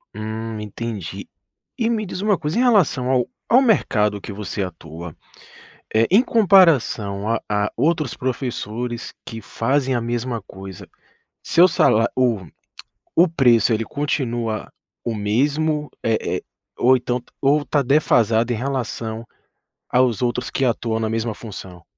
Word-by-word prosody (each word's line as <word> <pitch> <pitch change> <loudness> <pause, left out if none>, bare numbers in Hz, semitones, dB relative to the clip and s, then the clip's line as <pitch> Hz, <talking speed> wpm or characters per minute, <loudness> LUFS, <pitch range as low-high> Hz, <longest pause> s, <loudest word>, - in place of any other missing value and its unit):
Hum, 110 +1 -5
entendi. 105 -2 -6 0.5
E 230 -1 +1
me 220 -2 -1
diz 185 0 -5
uma 205 -3 +2
coisa, 150 +4 -3
em - - +3
relação 180 - +3
ao 125 -2 +2 0.2
ao 250 +3 +6
mercado 105 - +2
que 100 - -7
você 100 0 -4
atua, 85 -2 -8 0.8
eh, 110 +1 +4
em 205 +7 +6
comparação 160 - +3
a 115 0 0
a 105 0 0
outros 155 -4 +1
professores 120 -2 -4
que 115 0 -7
fazem 130 +5 0
a 120 - +1
mesma 120 0 -2
coisa, 95 -2 -10 0.5
seu 175 +2 +5
sala 115 -8 +3
o 115 -8 +1 0.7
o 175 - +6
preço 120 -8 +4
ele 115 +1 -1
continua 120 -6 -2 0.4
o 115 - -1
mesmo, 145 +8 0
eh 115 -1 +2 0.2
eh, - - -8 0.3
ou 130 +2 +5
então 125 0 -2
t - - -28
ou 145 +2 +3
tá 145 - +1
defasado 120 -4 +3
em - - +1
relação 115 -3 -3 0.6
aos 125 -3 +2
outros 125 0 -1
que 135 - 0
atuam 115 -2 0
na 110 -1 -1
mesma 115 0 -1
função? 95 -6 -10
120 Hz, 145 wpm, -21 LUFS, 110-145 Hz, 0.8 s, ao